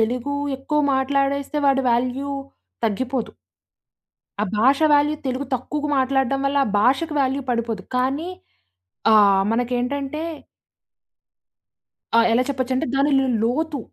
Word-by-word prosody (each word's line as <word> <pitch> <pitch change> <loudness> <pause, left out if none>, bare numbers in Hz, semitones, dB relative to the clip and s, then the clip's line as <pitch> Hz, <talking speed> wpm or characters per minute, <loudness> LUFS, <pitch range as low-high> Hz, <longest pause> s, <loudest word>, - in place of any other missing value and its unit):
తెలుగు 245 +5 -1 0.2
ఎక్కువ 300 +3 -1
మాట్లాడేస్తే 275 +2 0
వాడి 270 -1 +3
వాల్యూ 255 +3 -1 0.6
తగ్గిపోదు. 245 +3 -2 1.1
ఆ - - +2
భాష 265 +5 +4
వాల్యూ 290 +1 +3
తెలుగు 260 +2 -2
తక్కువగా 295 +4 -3
మాట్లాడ్డం 270 0 +1
వల్ల, 280 +1 +1
ఆ - - -2
భాషకు 275 +7 +1
వాల్యూ 270 +1 0
పడిపోదు. 230 -4 -2
కానీ 270 +7 -1 0.8
ఆహ్, 200 -2 +5
మనకేంటంటే 250 +5 -2 2.0
ఆ! - - +6
ఎలా 245 +2 +3
చెప్పొచ్చంటే, 260 -1 -1
దానిలో 275 -1 +3 0.2
లోతు, 290 +6 -1
265 Hz, 110 wpm, -22 LUFS, 245-280 Hz, 2.0 s, ఆ